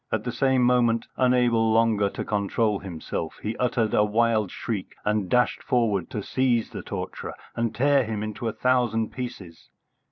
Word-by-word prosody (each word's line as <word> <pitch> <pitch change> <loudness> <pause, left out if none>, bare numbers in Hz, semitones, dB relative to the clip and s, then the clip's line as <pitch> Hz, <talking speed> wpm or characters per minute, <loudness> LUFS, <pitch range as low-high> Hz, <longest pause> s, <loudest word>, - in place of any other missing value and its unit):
At 110 -1 -1
the 120 - -3
same 130 +1 +2
moment, 120 -2 +3
unable 120 -3 +3
longer 110 -3 +3
to - - -5
control 105 0 0
himself, 85 -3 -5
he 110 +2 -2
uttered 120 -3 0
a 105 - +4
wild 110 -1 +2
shriek 100 -2 -5
and 105 -3 0
dashed 125 0 +2
forward 105 -8 0
to 105 - -4
seize 125 -2 0
the - - -6
torturer - - -6 0.2
and 115 -1 -1
tear 140 +1 +3
him 110 -1 -3
to 120 +2 -5
a - - 0
thousand 120 -3 +1
pieces. 100 -10 -8
115 Hz, 165 wpm, -25 LUFS, 105-125 Hz, 0.2 s, a